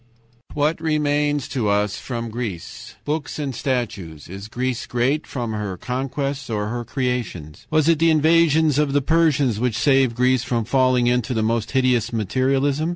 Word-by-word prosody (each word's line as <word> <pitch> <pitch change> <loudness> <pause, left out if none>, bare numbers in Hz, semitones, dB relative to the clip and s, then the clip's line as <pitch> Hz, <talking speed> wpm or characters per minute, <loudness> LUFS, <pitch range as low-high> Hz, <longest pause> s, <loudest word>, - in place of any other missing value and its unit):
"What 150 +3 0
remains 145 -3 0
to 115 -6 -1
us 105 +1 +1
from 115 -3 -5
Greece? 110 -7 -6
Books 150 0 -3
and 145 -3 -3
statues. 115 - -3
Is 100 +3 -8
Greece 125 +2 -3
great 130 +6 0
from 120 -4 -4
her 105 -3 -4
conquests 135 +4 -3
or 105 -2 -2
her 120 +1 -3
creations? 115 - -4
"Was 155 -1 +2
it 165 -2 +4
the 165 +1 +4
invasions 160 -1 +4
of 145 -2 +1
the 145 - +3
Persians 145 -7 +2
which 120 -2 0
saved 135 -2 +3
Greece 125 +1 +2
from 115 -4 -1
falling 130 0 +2
into 125 0 +1
the 110 - +1
most 115 +1 -1
hideous 125 -3 +2
materialism? 135 - 0
130 Hz, 160 wpm, -22 LUFS, 115-145 Hz, -, it